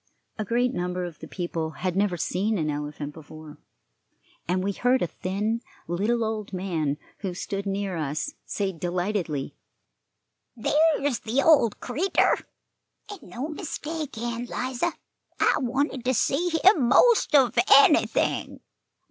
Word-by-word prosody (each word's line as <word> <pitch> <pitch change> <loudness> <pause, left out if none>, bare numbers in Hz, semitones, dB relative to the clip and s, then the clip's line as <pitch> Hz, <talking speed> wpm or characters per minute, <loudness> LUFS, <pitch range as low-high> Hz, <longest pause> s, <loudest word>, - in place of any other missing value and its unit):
A - - 0
great 245 +4 +1
number 180 -2 -2
of 170 -3 -9
the - - -9
people 170 -3 -3 0.2
had 180 -1 0
never 195 -2 +1
seen 200 +6 0
an 155 -3 -1
elephant 145 0 -5
before, 155 -1 -12 0.9
and 185 +1 0
we 200 - 0
heard 250 +5 +2
a - - +2
thin, 205 +7 -2 0.3
little 210 +7 0
old 215 -2 -4
man, 165 -6 -1 0.2
who 190 -4 -4
stood 195 +2 -4
near 195 -1 -2
us, 155 - -3
say 195 -2 -2
delightedly: 175 -3 -2 1.0
"There's 290 +1 +2
the 250 +5 0
old 285 -9 +4
creatur', 310 +11 +1 0.7
and 405 - -9
no 260 +6 -6
mistake, 310 - -5
Ann 235 +1 -3
'Liza. 255 +7 -2 0.5
I - - +4
wanted 265 +1 -1
to 255 0 +2
see 320 +10 +1
him 345 - +6
most 455 - +5
of 255 -5 +5 0.2
anything. 280 +2 +4
210 Hz, 135 wpm, -26 LUFS, 175-260 Hz, 1.0 s, him